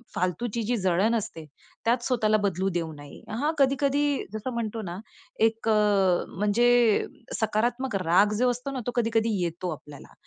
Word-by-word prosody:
फालतूची 220 +6 -1
जी 240 +3 0
जळण 190 +4 +2
असते, 170 -7 -4 0.4
त्यात 240 +1 +2
स्वतःला 215 -4 +2
बदलू 190 0 0
देऊ 165 -2 -2
नये. 145 -1 -12
हा 285 +8 0
कधी-कधी 280 +1 +2
जसं 220 +4 -4
म्हणतो 225 -1 -3
ना, 175 -1 -6 0.4
एक 225 0 +1
अ, 205 -4 +3
म्हणजे 235 +2 +3 0.3
सकारात्मक 235 +3 0
राग 185 +5 +4
जो 250 0 +3
असतो 250 +3 -5
ना, 265 - -4
तो - - 0
कधी-कधी 225 -1 +1
येतो 170 +2 -3
आपल्याला, 150 -1 -13
220 Hz, 150 wpm, -26 LUFS, 190-240 Hz, 0.4 s, राग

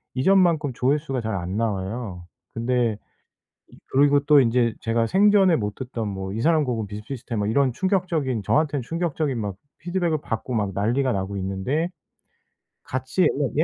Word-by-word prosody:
이전만큼 160 -2 +3
조회수가 135 0 0
잘 110 -2 -3
안 90 +3 -3
나와요. 100 -3 -3 0.3
근데 120 -2 0 0.7
이 - - -18
그리고 145 +1 +4
또 145 0 +5
인제 115 -2 +2
제가 115 0 +1
생전에 195 - +5
못 105 -5 -2
듣던 125 -4 -4
뭐 95 -1 -5
'이 110 - -3
사람 160 0 +3
곡은 115 -4 -2
비슷비슷해.' 115 +4 -6
뭐 105 -1 0
이런 130 +3 +2
충격적인, 170 - 0
저한텐 145 0 +1
충격적인 155 -3 -2
막 100 -3 -3 0.2
피드백을 175 -2 -1
받고 120 +1 -4
막 105 -3 0
난리가 120 +7 +1
나고 100 +1 -3
있는데 95 - -1 0.9
같이 130 +7 -2
옛날 145 -6 +2
125 Hz, 330 characters per minute, -24 LUFS, 110-150 Hz, 0.9 s, 또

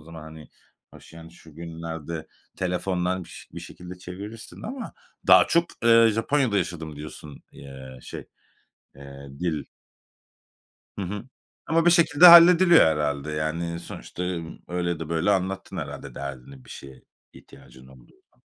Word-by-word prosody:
zaman, 80 0 -11
hani? 80 -1 -12 0.4
Hoş, - - -16
yani, 80 0 -12
şu 80 -3 -17
günlerde 80 -1 -7 0.3
telefondan 90 0 -2
biş - - -13
bir - - -8
şekilde 90 0 -11
çevirirsin 100 +5 -10
ama 250 +1 -6 0.3
daha - - +7
çok, 170 0 +3 0.2
eee, 115 0 +6
Japonya'da 120 0 +1
yaşadım 80 -4 -5
diyorsun, 75 -1 -10
eee, 65 -2 -11
şey, - - -9 0.7
eee, 70 0 -12
dil 80 -4 -2 1.4
Hı - - -2
hı. 105 +5 -6 0.4
Ama 165 +2 +1
bir - - +7
şekilde 170 -1 +6
hallediliyor 170 0 +9
herhâlde, 75 -1 -1
yani, 85 +2 -3
sonuçta, 85 - -8 0.5
öyle 90 0 -2
ya 85 -2 -2
da 80 - -7
böyle 85 +4 0
anlattın 95 0 -2
herhâlde - - -7
derdini, 70 -1 -9
bir - - -16
şeye 65 -1 -11 0.3
ihtiyacın 65 0 -17
olduğu 65 -2 -19 0.2
zaman. - - -36
85 Hz, 140 wpm, -25 LUFS, 75-100 Hz, 1.4 s, hallediliyor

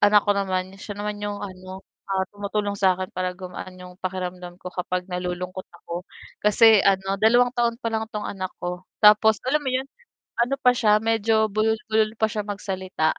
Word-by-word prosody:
anak 205 0 +6
ko 205 - +2
naman 190 -1 -1
siya 205 +1 -7
naman 205 0 -4
'yong 205 0 -3
ano, 185 -1 -8 0.3
ah, 190 -1 +1
tumutulong 205 0 -3
sa 190 -2 +4
akin 185 0 -5
para 185 0 -3
gumaan 185 0 -8
'yong 180 0 -12
pakiramdam 180 -1 -5
ko 180 - -6
kapag 180 0 -2
nalulungkot 180 +1 -4 0.2
ako 175 +2 -5 0.3
kasi 215 +1 +6
ano 195 0 +2
dalawang 240 +3 +5
taon 235 -2 +1
pa 230 - -1
lang 220 0 -1
itong 210 -2 -5
anak 185 -2 -5
ko, 180 +1 -4 0.2
tapos 215 +1 +7
alam 295 +4 +1
mo 275 - -3
'yon 260 +1 0 0.6
ano 270 +3 +1
pa 250 -2 +5
siya 210 -3 +4
medyo 225 0 +2
bulol-bulol 220 +1 0
pa 220 - +3
siya 215 -1 -3
magsalita 190 -5 -2
200 Hz, 180 wpm, -24 LUFS, 185-220 Hz, 0.6 s, tapos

